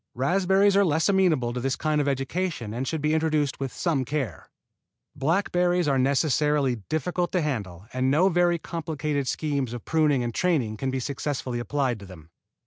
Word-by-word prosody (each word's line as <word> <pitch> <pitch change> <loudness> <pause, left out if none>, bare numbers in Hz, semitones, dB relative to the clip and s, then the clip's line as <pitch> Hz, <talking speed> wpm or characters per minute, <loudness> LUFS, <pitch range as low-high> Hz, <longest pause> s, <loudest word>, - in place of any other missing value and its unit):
Raspberries 190 +8 +3
are 200 - +5
less 160 0 +2
amenable 165 -11 +2
to 125 - -3
this 130 +1 -1
kind 155 -1 0
of 145 - -1
education 135 - -2
and 130 +3 -3
should 160 -2 -2
be 155 +1 +2
introduced 155 -3 0
with 135 -2 -3
some 155 -3 0
care. 130 - -4 0.7
Blackberries 175 +3 +1
are 135 -2 +2
necessarily 140 -1 +2
difficult 175 +3 -1
to 180 - +2
handle 100 - -4
and 130 +1 +1
no 155 +7 +4
very 175 -1 +3
complicated 155 -4 -3
schemes 140 -4 -1
of 120 - -7
pruning 150 -5 +2
and 120 -1 -3
training 140 -12 0
can 135 +4 -2
be 130 0 -1
successfully 130 -2 -3
applied 130 -2 -1
to 100 - -11
them. 85 -3 -14
145 Hz, 175 wpm, -26 LUFS, 130-165 Hz, 0.7 s, are